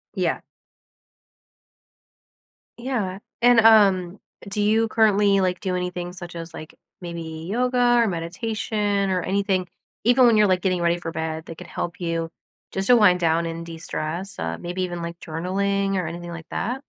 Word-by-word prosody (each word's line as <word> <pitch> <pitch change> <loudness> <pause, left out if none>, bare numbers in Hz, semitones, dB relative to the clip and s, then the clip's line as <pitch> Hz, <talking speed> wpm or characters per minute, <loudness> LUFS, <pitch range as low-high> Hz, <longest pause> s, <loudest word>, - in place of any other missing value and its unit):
Yeah. - - 0 2.4
Yeah. 215 -7 -2 0.2
And, 245 -1 +6
um, 200 -4 +5 0.3
do 205 +1 -2
you 220 +2 +3
currently, 205 -3 +3
like, 180 -1 0
do 185 -2 -1
anything 180 -1 -4
such 175 -1 -9
as, 165 0 -7
like, 155 - -10 0.3
maybe 170 -1 -6 0.3
yoga 245 +1 +2
or 235 - +4
meditation 200 +3 -1
or 185 -1 +1
anything 190 -1 0 0.4
even 245 +2 +5
when 230 -3 +5
you're, 210 -1 +5
like, 185 -1 +2
getting 185 -2 0
ready 170 0 +2
for 165 -1 -5
bed 160 0 -4
that 165 - -9
could - - -9
help 175 +1 -5
you 165 -1 -2 0.4
just 190 0 -2
to 250 - +7
wind 195 -6 +5
down 165 -1 +2
and 165 0 -5
destress? 165 +3 -5
Uh, - - -3
maybe 180 +1 -3
even, 175 -1 -4
like, 170 0 -6
journaling 195 +4 -1
or 185 -3 -1
anything 175 +1 -6
like 165 -1 -8
that. 250 +6 -3
185 Hz, 165 wpm, -23 LUFS, 170-210 Hz, 2.4 s, to